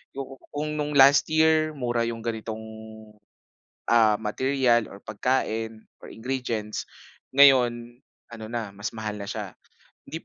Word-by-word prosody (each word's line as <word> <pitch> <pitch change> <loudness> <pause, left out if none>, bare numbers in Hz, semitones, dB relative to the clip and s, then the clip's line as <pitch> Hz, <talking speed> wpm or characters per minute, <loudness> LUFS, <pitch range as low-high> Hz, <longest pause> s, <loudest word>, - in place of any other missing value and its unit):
Ku 135 -1 -7 0.2
kung 150 +1 -3
nung 150 0 -2
last 140 +1 +7
year 155 0 +3
mura 120 -3 -1
yung 115 -1 -5
ganitong, 110 -1 -4 1.3
ah, 110 -2 +5
material, 120 +2 +1
or 100 - -13
pagkain, 110 0 -2 0.2
or - - -13
ingredients, 115 -3 -4 0.5
ngayon 120 -4 +4 0.3
ano 115 -2 -8
na 115 -2 -4
mas 105 +3 -6
mahal 105 -2 -5
na 100 - -6
siya. - - -6 0.5
Hindi 160 - -7
120 Hz, 130 wpm, -25 LUFS, 110-135 Hz, 1.3 s, last